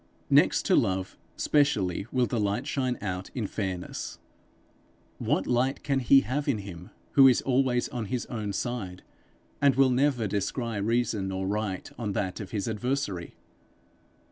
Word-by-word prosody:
Next - - +4
to - - +4
love, 95 0 0 0.2
specially 110 - +1
will 125 -1 +2
the 120 - -2
light 100 -1 0
shine 130 -3 -1
out 95 -2 -3
in 120 -5 -1
fairness. 95 -3 -4 1.0
What - - 0
light 125 +2 0
can 140 -2 +1
he 135 +2 +6
have 140 +3 -2
in 135 -6 +2
him 95 -2 -9 0.2
who 135 -1 +8
is 125 - +4
always 130 -2 +2
on 120 -3 -4
his 120 +4 -3
own 110 -4 -4
side, 100 -4 -4 0.6
and 140 -3 +5
will 135 -1 +4
never 130 -2 +2
descry 105 +3 -2
reason 110 -3 0
or 95 0 -2
right 100 -1 -2
on 105 -4 -2
that 95 -2 -2
of 105 - -6
his 105 -2 -3
adversary? 110 -5 -2
115 Hz, 155 wpm, -28 LUFS, 100-130 Hz, 1.0 s, who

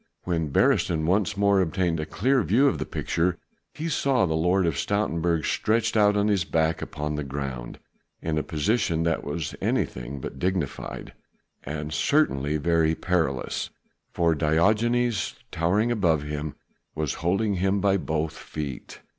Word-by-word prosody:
When 80 -4 -1
Beresteyn 80 +2 +2
once 100 +3 +1
more 100 -1 +4
obtained 90 -1 0
a 75 - -3
clear 125 - +2
view 115 - +3
of - - 0
the - - -3
picture, 85 +1 -1 0.4
he 160 - -3
saw 135 - +2
the 80 - -1
Lord 90 +4 +2
of 85 - +1
Stoutenburg 85 -5 0
stretched 110 +1 +1
out 105 -1 +4
on 100 +1 +2
his 100 -4 +2
back 80 0 0
upon 75 0 -4
the 75 0 -2
ground 65 -3 -5 0.4
in 80 -1 -1
a - - 0
position 80 +2 0
that 85 -1 0
was 75 0 -4
anything 60 +3 -2
but - - -7
dignified 90 -6 -3 0.5
and 75 +1 -5
certainly 75 - +2
very 80 0 +2
perilous, 80 -8 -1 0.4
for 85 -2 +2
Diogenes 105 +9 +2 0.2
towering 100 +8 +1
above 85 -10 +2
him 75 0 -4 0.4
was 75 -2 -1
holding 100 +5 +1
him 95 +2 +1
by 100 0 +3
both 80 -2 -2
feet. 75 -5 -7
85 Hz, 150 wpm, -26 LUFS, 75-100 Hz, 0.5 s, more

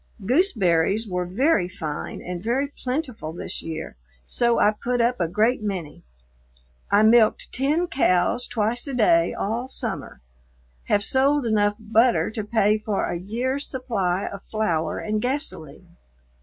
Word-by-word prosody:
Gooseberries 215 - +2
were 180 -2 -2
very 205 - +2
fine 155 -6 -6
and 180 -1 -5
very 270 +5 -1
plentiful 255 - -3
this 175 - -5
year, 160 - -6 0.3
so 235 - +2
I 210 - +4
put 245 +3 -2
up 240 +1 +1
a 170 - +2
great 220 +8 +1
many. 185 -8 -5 0.9
I 205 +1 +4
milked 220 0 +4
ten 295 +7 +1
cows 215 - +1
twice 230 +3 -1
a 275 - -4
day 335 +6 +3
all 235 +5 -3
summer; - - -5 0.6
have 205 - +2
sold 275 +3 +3
enough 205 -2 +2
butter 225 +2 +2
to 220 -1 -4
pay 210 0 +2
for 210 -2 -1
a 175 - -3
year's 250 +9 -2
supply 200 -8 -1
of 200 0 -7
flour 175 -8 -1
and 215 0 -2
gasoline. 180 - -4
220 Hz, 140 wpm, -24 LUFS, 185-250 Hz, 0.9 s, I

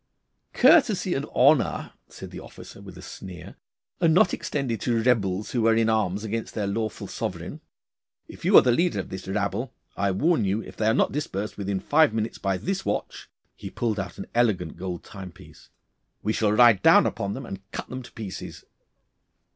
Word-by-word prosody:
'Courtesy 210 - +4
and 140 +2 -3
honour,' 140 +1 +2
said - - -10
the - - -8
officer, - - -12
with 95 -3 -11
a 90 - -11
sneer, 90 -1 -10 0.5
'are 170 - +4
not 175 +2 +4
extended 130 -7 -3
to 120 -2 +1
rebels 105 -5 +1
who 115 -3 +1
are 115 - +4
in 115 0 +2
arms 105 -2 0
against 110 +1 -4
their 105 - -1
lawful 110 +2 -3
sovereign. - - -5 0.7
If - - -13
you - - +6
are - - +9
the 125 - +3
leader 170 +8 +1
of - - -5
this 95 0 -7
rabble, 105 +5 -2 0.2
I 100 0 0
warn 145 - +2
you 100 +2 0
if - - -12
they 110 - 0
are 110 - +3
not - - +2
dispersed 105 -8 -4
within 100 -1 -2
five 145 +2 +3
minutes 110 0 -3
by 95 -1 -1
this 195 - -3
watch' - - -4 0.3
he - - -8
pulled 110 -4 -2
out 95 - -5
an 95 - -6
elegant 105 -9 +1
gold 90 -1 -6
time 95 -4 -9
piece - - -17 0.5
'we 110 - 0
shall 105 -2 +1
ride 115 -3 +6
down - - +6
upon 100 0 -2
them 135 0 -7
and 95 -3 -7
cut - - -5
them 130 0 -6
to 125 - -13
pieces. 100 -4 -8
110 Hz, 195 wpm, -25 LUFS, 95-125 Hz, 0.7 s, are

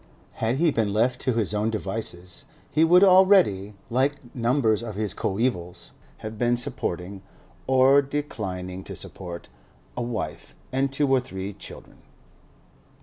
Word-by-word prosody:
Had 115 +2 +1
he 160 +3 +3
been 110 -5 0
left 125 +4 +1
to 130 - +1
his 110 -3 0
own 105 +1 +1
devices, 95 -4 -5 0.3
he 155 - +3
would 180 +3 +6
already, 185 - +5 0.2
like 130 0 -1
numbers 115 -3 +2
of 110 -4 -6
his 105 -1 -2
coevals, 95 -5 -2 0.3
have 110 0 -6
been 120 0 +2
supporting 95 -4 -4 0.5
(or 130 +2 +6
declining 95 -11 -4
to - - -7
support) 85 -2 -7 0.5
a - - -3
wife 120 -2 -5 0.2
and 135 +1 0
two 145 +1 +1
or 135 -1 +4
three 95 -4 -6
children. - - -11
115 Hz, 140 wpm, -25 LUFS, 100-135 Hz, 0.5 s, would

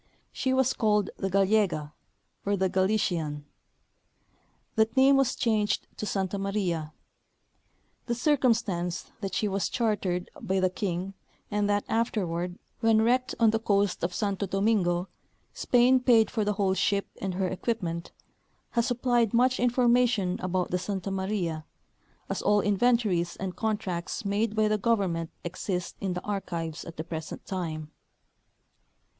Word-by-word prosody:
She 260 - -1
was 260 0 +3
called 210 -3 +1
the 195 - -2
Gallega, 195 -6 +2 0.5
or 200 0 0
the 190 0 +1
GaUtian. 180 -7 0 1.3
That 225 +2 +1
name 270 +1 +6
was 270 -2 +2
changed 215 -3 +1
to 210 - -4
Santa 195 0 -1
Maria. 185 -6 -1 1.2
The 240 - 0
circumstance 230 - +1
that 195 -2 -3
she - - +1
Avas 195 -2 -1
chartered 200 -6 -1
by 190 +1 0
the 185 -1 +2
king, 185 0 -3 0.4
and 205 0 +1
that 205 0 +1
afterward, 180 -6 -1 0.2
when 225 -1 +4
wrecked 255 +3 +1
on 225 -2 +5
the 225 - +1
coast 200 -4 +1
of 175 - 0
Santo 200 -2 -1
Domingo, 195 -3 +1 0.5
Spain 250 +1 +4
paid 235 -3 +4
for 220 - 0
the 210 0 +1
whole 195 -2 +1
ship 200 +1 +1 0.2
and 190 -2 -2
her 190 0 0
equipment, 180 -3 -3 0.6
has 235 -1 +1
supplied 240 -2 +1
much 255 +2 +3
information 240 -5 +2
about 185 -1 -1
the 180 - +1
Santa 195 0 -3
Maria, 190 -5 -2 0.6
as - - -3
all 210 0 +3
inventories 205 -4 +2
and 190 -1 -5
contracts 205 -4 -2
made 205 +2 0
by 215 0 +3
the 215 0 +1
government 190 -7 0
exist 180 +1 -3
in 190 -2 -1
the 180 - -5
archives 170 -5 -4
at 165 - -10
the 160 - -3
present 160 -1 -6
time. 160 -5 -4
200 Hz, 140 wpm, -28 LUFS, 180-225 Hz, 1.3 s, name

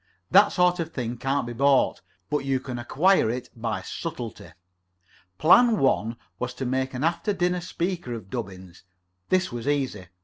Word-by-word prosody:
That 200 +2 +7
sort 180 -1 +2
of 165 -1 -3
thing 120 -4 -4
can't 135 +1 -1
be 120 - -5
bought, 140 +2 +3 0.3
but 150 - +2
you 135 -1 0
can 130 -2 -6
acquire 150 - +3
it 125 +2 -4
by 115 -2 -3
subtlety. 125 -9 -6 0.9
Plan 225 - +6
one 115 - +1 0.2
was 125 0 -3
to 130 - -4
make 130 +1 -1
an 125 - -3
after 170 +5 0
dinner 180 -1 0
speaker 175 -3 -3
out - - -3
of 95 -4 -12
Dubbins. 90 -2 -7 0.5
This 185 -4 +2
was 120 +1 -5
easy. 135 -10 -1
135 Hz, 170 wpm, -25 LUFS, 120-170 Hz, 0.9 s, That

